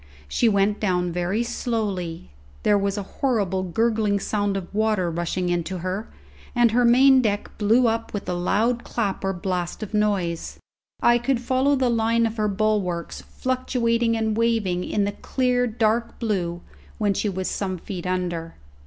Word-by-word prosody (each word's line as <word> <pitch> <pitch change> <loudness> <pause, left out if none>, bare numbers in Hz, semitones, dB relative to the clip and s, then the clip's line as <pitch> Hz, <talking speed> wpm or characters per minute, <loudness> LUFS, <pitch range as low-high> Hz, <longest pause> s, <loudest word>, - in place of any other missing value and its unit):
She 230 - +2
went 200 0 +2
down 180 -4 0
very 180 +6 0
slowly; 205 - -3 0.3
there 205 - +4
was 200 0 0
a 205 - -2 0.2
horrible 205 -8 +1
gurgling 210 +2 +1
sound 205 -1 -1
of 190 0 -7
water 210 -5 +1
rushing 175 +2 -2
into 175 +1 -1
her, 190 +4 -3 0.5
and 240 -2 +4
her 245 +2 +3
main 260 +2 +6
deck 205 -3 -2
blew 225 +4 +4
up 230 0 -1
with 205 - -5
a 180 - -1
loud 220 +7 +1
clap 205 -5 -2
or 195 - +1
blast 180 +1 -3
of 215 - -8
noise. 200 -6 0 0.5
I 240 0 +5
could 245 +1 0
follow 260 +3 +2
the 260 -2 +1
line 230 0 +2
of 225 0 -3
her 215 -1 +1
bulwarks 200 -4 -1
fluctuating 235 -3 0
and 220 -1 0
waving 220 -6 +1
in 205 - 0
the 200 - 0
clear 250 +3 0
dark 225 +1 0
blue 175 -6 -2 0.4
when 205 -2 +1
she 210 - -1
was 190 -1 -3
some 190 -2 -2
feet 180 0 -6
under. 175 -3 -2
210 Hz, 165 wpm, -24 LUFS, 185-230 Hz, 0.5 s, main